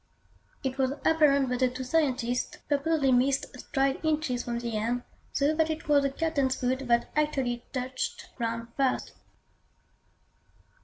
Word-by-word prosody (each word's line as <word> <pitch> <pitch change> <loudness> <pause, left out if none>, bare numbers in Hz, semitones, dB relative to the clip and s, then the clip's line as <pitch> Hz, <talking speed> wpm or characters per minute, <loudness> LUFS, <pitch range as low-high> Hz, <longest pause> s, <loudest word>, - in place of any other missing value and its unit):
It 265 0 -3
was 265 0 +2
apparent 285 -4 +4
that 250 0 -1
the 255 -1 +3
two 255 +1 -5
scientists 255 -4 0
purposely 290 -1 +2
missed 260 +2 +2
stride 275 +1 0
inches 305 -6 0
from 235 -1 -2
the 235 -1 -3
end, 235 +3 -1 0.3
so 285 +2 +2
that 320 0 +2
it 315 0 -4
was 290 -1 +5
the 275 - +1
Captain's 280 -3 0
foot 255 +1 0
that 235 0 +2
actually 270 -6 0
touched 255 0 -4
ground 230 -1 -3
first. 270 -2 0
265 Hz, 145 wpm, -28 LUFS, 245-295 Hz, 0.3 s, was